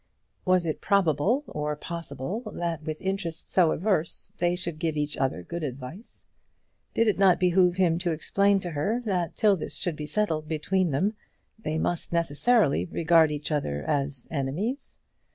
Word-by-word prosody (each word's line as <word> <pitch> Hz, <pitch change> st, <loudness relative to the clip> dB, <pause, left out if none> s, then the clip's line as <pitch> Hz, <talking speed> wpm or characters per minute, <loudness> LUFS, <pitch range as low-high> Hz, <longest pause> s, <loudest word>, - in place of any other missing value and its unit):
Was 185 Hz, -2 st, +3 dB
it 155 Hz, -, -2 dB
probable, 200 Hz, -, +2 dB
or 150 Hz, -, -3 dB
possible, 170 Hz, -, -5 dB
that 170 Hz, -2 st, -2 dB
with 155 Hz, 0 st, -5 dB
interests 190 Hz, -4 st, -3 dB
so 175 Hz, -4 st, +5 dB
adverse, 180 Hz, -3 st, -1 dB
they 175 Hz, 0 st, +2 dB
should 170 Hz, -3 st, -5 dB
give 160 Hz, -2 st, -1 dB
each 150 Hz, 0 st, -1 dB
other 130 Hz, -10 st, -1 dB
good 170 Hz, -, -5 dB
advice? 140 Hz, -, -7 dB, 0.7 s
Did 230 Hz, -, +3 dB
it 210 Hz, -, +2 dB
not 190 Hz, -3 st, +5 dB
behove 180 Hz, -1 st, +4 dB
him 175 Hz, -3 st, +2 dB
to 175 Hz, -, -1 dB
explain 200 Hz, +5 st, +2 dB
to 175 Hz, -, -4 dB
her 180 Hz, +11 st, 0 dB
that 180 Hz, -5 st, -1 dB
till 210 Hz, -2 st, +4 dB
this 155 Hz, -4 st, -5 dB
should 175 Hz, 0 st, -2 dB
be 150 Hz, 0 st, -6 dB
settled 160 Hz, -6 st, 0 dB
between 170 Hz, +4 st, 0 dB
them, 185 Hz, +10 st, +1 dB, 0.5 s
they 155 Hz, -7 st, -2 dB
must 170 Hz, +1 st, -1 dB
necessarily 170 Hz, -, +2 dB
regard 165 Hz, -2 st, +4 dB
each 150 Hz, +1 st, -4 dB
other 75 Hz, -, -1 dB
as 140 Hz, -3 st, -2 dB
enemies? 165 Hz, -, -3 dB
170 Hz, 165 wpm, -27 LUFS, 150-190 Hz, 0.7 s, so